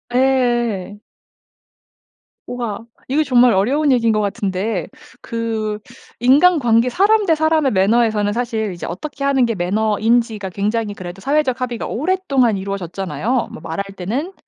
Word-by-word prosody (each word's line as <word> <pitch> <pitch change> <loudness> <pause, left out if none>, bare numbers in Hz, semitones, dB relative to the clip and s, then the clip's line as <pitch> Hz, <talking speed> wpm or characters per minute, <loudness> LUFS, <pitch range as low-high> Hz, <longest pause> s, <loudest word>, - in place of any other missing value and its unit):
예 - - +4
예 240 -7 +1
예. 205 - -14 1.5
우와. 235 -2 -5 0.2
이거 295 +4 +2
정말 250 -4 +4
어려운 275 +10 +2
얘기인 230 -3 +3
것 215 - +1
같은데 195 -2 -2 0.3
그 220 -2 -3 0.4
인간관계 255 -3 +4
사람 410 - +3
대 330 -4 +3
사람의 315 -3 +2
매너에서는 210 +1 +2
사실 225 -3 -2
이제 175 - -7
어떻게 275 - -6
하는 275 -2 +3
게 230 -1 -2
매너인지가 215 +3 0
굉장히 210 +3 -2
그래도 185 -1 -9
사회적 275 0 0
합의가 240 -2 -3
오랫동안 275 - +1
이루어졌잖아요. 195 - -3
뭐 - - -10
말할 165 +4 -4
때는 245 - -3
230 Hz, 325 characters per minute, -19 LUFS, 205-265 Hz, 1.5 s, 예